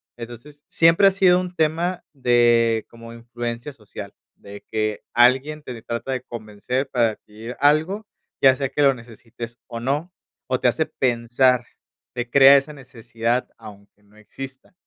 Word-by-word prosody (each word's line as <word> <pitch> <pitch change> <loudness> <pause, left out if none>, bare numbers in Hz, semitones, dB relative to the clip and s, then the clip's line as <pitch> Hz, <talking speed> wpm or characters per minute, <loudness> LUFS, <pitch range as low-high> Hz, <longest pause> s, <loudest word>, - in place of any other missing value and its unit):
Entonces 120 +5 -11
siempre 165 +4 +5
ha - - +5
sido 185 -2 +4
un 180 0 -7
tema 170 +3 0
de 120 -3 +3
como 115 0 -12
influencia 120 +3 -6
social, 105 -5 -10 0.2
de 100 0 -12
que 110 -1 -1
alguien 135 +5 +3
te 125 -4 -8
trata 115 +4 -5
de 130 -1 -2
convencer 120 +4 -4
para 120 -4 +2
adquirir 110 +4 -11
algo, 160 +9 +2 0.4
ya 130 -1 +7
sea 135 -1 -2
que 145 - 0
lo 135 -1 +5
necesites 115 0 -10
o 115 -1 -6
no, 145 +8 -2 0.4
o 130 0 0
te - - +2
hace 160 +6 0
pensar, 120 0 +1 0.5
te 120 0 -4
crea 140 +2 +8
esa 140 +3 -2
necesidad, 120 -2 -3
aunque 105 -2 -15
no 105 +1 -26
exista. 135 - -10
125 Hz, 155 wpm, -22 LUFS, 115-140 Hz, 0.5 s, crea